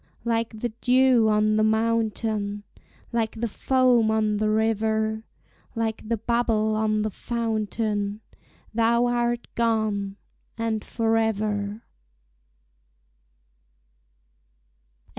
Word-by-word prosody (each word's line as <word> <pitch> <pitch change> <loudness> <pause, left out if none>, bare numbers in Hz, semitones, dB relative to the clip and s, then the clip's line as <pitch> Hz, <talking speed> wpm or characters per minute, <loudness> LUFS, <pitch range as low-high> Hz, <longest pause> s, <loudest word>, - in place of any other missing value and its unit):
Like 230 -1 -1
the 240 - 0
dew 250 -3 +4
on 215 0 +3
the 215 - +3
mountain, 220 -2 0 0.5
Like 225 -1 0
the 235 - 0
foam 250 0 +2
on 215 -1 +1
the 215 +1 +1
river, 220 0 0 0.5
Like 225 -1 -3
the 230 - +1
bubble 225 -1 +1
on 215 -1 +1
the 215 - -2
fountain, 215 -2 -2 0.5
Thou 235 +1 +3
art 240 0 0
gone, 215 -4 0 0.4
and 225 -2 -1
forever! 215 -2 -1
220 Hz, 90 wpm, -25 LUFS, 215-230 Hz, 0.5 s, dew